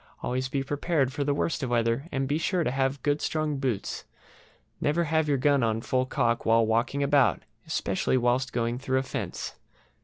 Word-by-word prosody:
Always 130 +1 -1
be 135 0 -1
prepared 145 -1 0
for 145 0 -1
the 140 0 0
worst 155 +2 -1
of 130 - -2
weather, 115 +4 +1
and 135 -1 -1
be 145 +3 0
sure 175 +1 +1
to - - 0
have 135 +1 -1
good 145 0 +1
strong 155 -2 -1
boots. 125 -7 -2 0.8
Never 155 +4 +2
have 160 -1 +1
your 140 - +3
gun 140 +1 +3
on 110 -1 +1
full 130 +2 0
cock 115 -2 0
while 115 0 +4
walking 115 +6 +1
about, 140 -3 +3 0.2
especially 160 -2 0
whilst 125 +1 +1
going 120 0 -1
through 130 -1 0
a 130 - +1
fence. 125 -8 -5
135 Hz, 190 wpm, -27 LUFS, 125-145 Hz, 0.8 s, while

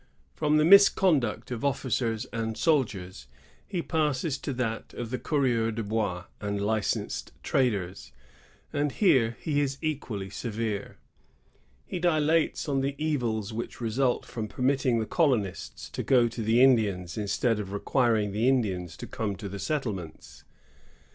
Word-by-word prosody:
i - - -27
From 150 0 +3
the 155 - +4
misconduct 165 - +5
of 120 +1 -4
officers 125 -4 0
and 110 -1 -2
soldiers, 100 - 0 0.4
the 180 - -1
father - - -22 0.2
passes 140 +1 -2
to - - -4
that 115 -3 -3
of 120 -1 -5
the 130 - -2
coureurs 120 -7 +1
de 115 - -2
hois 105 -4 -1 0.2
and 100 -1 -2
licensed 105 +1 -1
traders; 100 -9 -1 0.6
and 145 -1 0
here 120 - +3
he 145 -2 0
is 135 -1 -1
equally 125 - -3
severe. 110 -3 -4 0.9
He 180 - -4
dilates 160 -2 +2
on 135 -2 +1
the 140 +1 -1
evils 120 -9 -1
which 115 +2 -5
result 120 +2 0
from 110 -2 -5
permitting 130 +1 +1
the 110 - -1
colonists 120 - 0
to - - -3
go 125 -3 +4
to 115 0 -5
the 115 +3 +4
Indians 100 -9 +3
instead 105 +2 0
of 100 -2 -5
requiring 110 0 +1
the 110 +5 +2
Indians 95 -10 0
to - - -7
come 105 -3 -3
to 100 - -7
the 100 +1 -6
settlements. 100 - -4
115 Hz, 150 wpm, -28 LUFS, 105-140 Hz, 0.9 s, misconduct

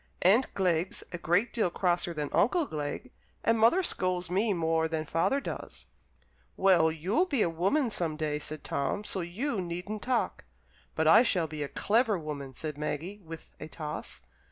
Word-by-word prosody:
"Aunt 215 +9 +4
Glegg's 180 -2 0
a 175 - -5
great 175 +8 +1
deal 220 -6 +1
crosser 175 0 0
than 150 -3 -4
Uncle 325 - +3
Glegg, 155 - -5 0.3
and 230 0 +3
mother 235 +13 +5
scolds 180 - -1
me 205 +4 +2
more 165 -2 +1
than 160 -1 -2
father 165 - +1
does." 275 - -7 0.7
"Well, 175 -4 +5
you'll 190 - 0
be 275 -10 +2
a 170 - 0
woman 220 - +1
some 165 -6 -2
day," 150 -1 -1
said 155 0 -7
Tom, 140 +9 -2
"so 195 -2 -3
you 205 +6 -2
needn't 180 +5 -5
talk." 250 -2 -1 0.5
"But - - +1
I - - +8
shall 185 -9 +2
be 155 -1 -6
a 145 - -1
clever 220 - +1
woman," 145 -5 -6
said 150 0 -5
Maggie, 165 +7 -4
with 165 0 -10
a - - -6
toss. 150 - -7
175 Hz, 175 wpm, -29 LUFS, 160-215 Hz, 0.7 s, I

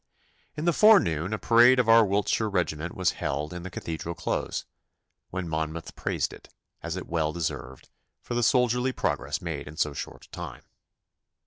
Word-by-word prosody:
In 155 - -3
the 170 - +3
forenoon 95 - +5
a 110 - -1
parade 120 +4 +6
of 125 -2 +2
our 115 0 +7
Wiltshire 105 +2 +1
regiment 85 -4 -2
was 90 -2 +2
held 75 +4 -2
in 90 - -6
the 95 - -6
Cathedral 85 -1 -5
Close, 85 - -2 0.6
when 95 -1 -4
Monmouth 80 +1 -4
praised - - -2
it, - - -14 0.3
as 85 +1 -4
it 95 - -5
well 80 -2 0
deserved, 75 -5 -5 0.3
for - - -7
the 120 - +1
soldierly 125 +1 +2
progress 75 - -2
made 80 -5 -4
in 75 +2 -10
so 75 -1 +1
short - - -7
a - - -25
time. - - -7
90 Hz, 175 wpm, -27 LUFS, 80-115 Hz, 0.6 s, our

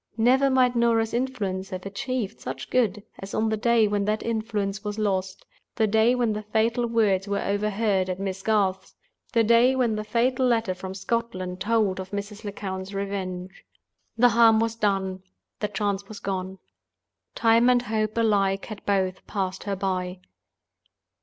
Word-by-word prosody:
Never 260 +4 +4
might 255 -2 +3
Norah's 230 -1 +2
influence 210 -7 -2
have 185 0 -6
achieved 235 +1 -3
such - - -7
good 210 -5 +1 0.2
as 195 +1 -7
on 220 0 +1
the 220 - +1
day 230 0 +3
when 205 -1 0
that 215 +1 -1
influence 215 -3 -2
was 210 0 -4
lost—the 195 +2 -2
day 220 +3 +3
when 240 -3 +1
the 210 - -3
fatal 225 +3 0
words 210 -4 +2
were 200 0 -1
overheard 200 -1 0
at 185 0 -3
Miss 195 -1 -3
Garth's—the 215 - -1
day 235 +4 +5
when 245 -4 +1
the 215 - -3
fatal 245 +4 +1
letter 225 -5 +1
from 185 +1 -7
Scotland 185 -4 -3
told 210 -3 +1
of 190 0 -6
Mrs. 205 +2 -6
Lecount's 195 -1 -5
revenge. 190 -2 -4 0.5
The 245 +1 +6
harm 230 -2 +5
was 225 0 0
done; 195 -4 -1 0.4
the 210 - -1
chance 200 -1 -2
was 215 - -9
gone. 190 -1 -4 0.8
Time 230 +1 +4
and 245 -1 +3
Hope 215 -1 -2
alike 200 -4 +2
had 215 -3 -9
both 190 -2 0
passed 190 -2 -3
her 200 -1 -1
by. 185 -1 -2
210 Hz, 160 wpm, -25 LUFS, 195-230 Hz, 0.8 s, The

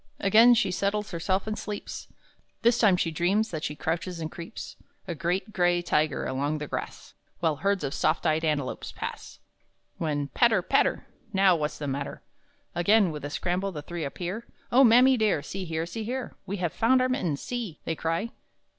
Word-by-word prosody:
Again 225 +5 +6
she 220 -5 +2
settles 200 +2 -1
herself 185 +3 -1
and 215 0 -2
sleeps; 210 -1 -6 0.6
This 235 0 +4
time 200 -5 +5
she 165 - 0
dreams 190 +7 +1
that 155 -2 -4
she 150 - -3
crouches 170 +3 -3
and 160 -1 -4
creeps, 175 +6 -8 0.3
A 175 - -2
great 180 +6 -2
gray 175 -1 +2
tiger 150 -3 +1
along 145 +4 -1
the 150 - -4
grass, - - -6 0.3
While 160 -3 +1
herds 200 -1 0
of 140 0 -2
soft 155 +2 +1
eyed 160 0 +2
antelopes 150 -4 -1
pass, - - -7 0.6
When 145 -3 -1
patter, 225 - +3
patter! - - +2 0.3
"Now 190 -2 +5
what's 150 -2 -2
the 150 - -5
matter?" 140 0 -4 0.5
Again, 195 +1 +4
with 150 -2 -7
a 145 - -3
scramble, 185 +5 -1
the 150 -4 -7
three 170 +1 -5
appear; 180 +10 -5 0.2
"Oh 260 +3 +7
mammy 250 +2 +6
dear, 210 -10 +1
see 190 +5 -5
here, 160 -1 -2
see 220 +6 -5
here, 250 +3 -4
We 200 - -3
have 175 -3 -2
found 255 +3 +3
our 255 - +3
mittens 180 - -1
see!" 235 -10 -4
they 165 - 0
cry. 165 +9 -2
175 Hz, 185 wpm, -27 LUFS, 155-215 Hz, 0.6 s, Oh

